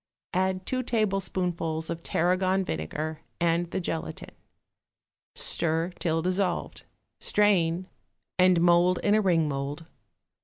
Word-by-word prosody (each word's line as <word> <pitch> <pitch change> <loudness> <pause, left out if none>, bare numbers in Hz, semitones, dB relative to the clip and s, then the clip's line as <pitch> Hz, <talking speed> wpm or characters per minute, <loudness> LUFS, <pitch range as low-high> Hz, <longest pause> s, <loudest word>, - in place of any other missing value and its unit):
Add 185 0 0
two 255 0 -1
tablespoonfuls 185 -8 -1
of 165 0 -5
tarragon 185 +3 +1
vinegar 150 - -4 0.2
and 170 0 +1
the - - -2
gelatine, 165 -3 -5 1.0
stir 165 +2 +1
till 165 -1 0
dissolved, 185 0 -1 0.3
strain, 185 -4 +2 0.5
and 180 -2 +5
mould 175 +1 +4
in 205 - +3
a 215 - +4
ring 170 -5 +2
mould. 140 +3 -4
175 Hz, 110 wpm, -27 LUFS, 165-190 Hz, 1.0 s, and